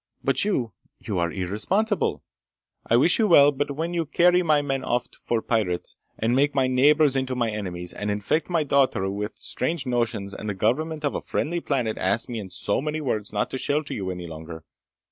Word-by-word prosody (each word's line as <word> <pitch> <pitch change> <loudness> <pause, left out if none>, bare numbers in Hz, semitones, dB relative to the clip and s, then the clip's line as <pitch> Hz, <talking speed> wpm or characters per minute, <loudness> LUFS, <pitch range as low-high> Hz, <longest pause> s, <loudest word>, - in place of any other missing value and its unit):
But - - +1
you... 130 - -1 0.2
you 100 -4 -3
are 85 -1 0
irresponsible! 110 - -1 0.6
I 115 - +3
wish 165 - +3
you 220 - +4
well, 145 -5 +7
but 140 0 -3
when 165 +3 -3
you 165 -3 -1
carry 180 +4 +4
my 155 -4 +3
men 135 -2 -2
off 120 -1 0
for 115 -2 -2
pirates, 100 -7 -1 0.2
and 115 +2 +1
make 145 +2 +2
my 135 -1 +3
neighbors 140 +3 +4
into 130 -1 -1
my 120 -3 0
enemies, 90 -4 -4
and 105 - -4
infect 105 - 0
my 170 -3 +1
daughter 135 -9 +2
with 105 +2 -4
strange 145 +2 -3
notions 115 -5 -1
and 105 - -5
the 105 - -2
government 150 +10 0
of 145 - 0
a - - -3
friendly 170 +3 -2
planet 125 -9 -1
asks 100 +6 +1
me 120 -2 -3
in 100 -3 -7
so 100 +5 -1
many 155 +2 -2
words 110 -8 -1
not 105 0 -1
to 130 - -3
shelter 145 +1 -1
you 95 -3 -3
any 90 -1 -5
longer 80 0 -8
125 Hz, 200 wpm, -25 LUFS, 105-150 Hz, 0.6 s, well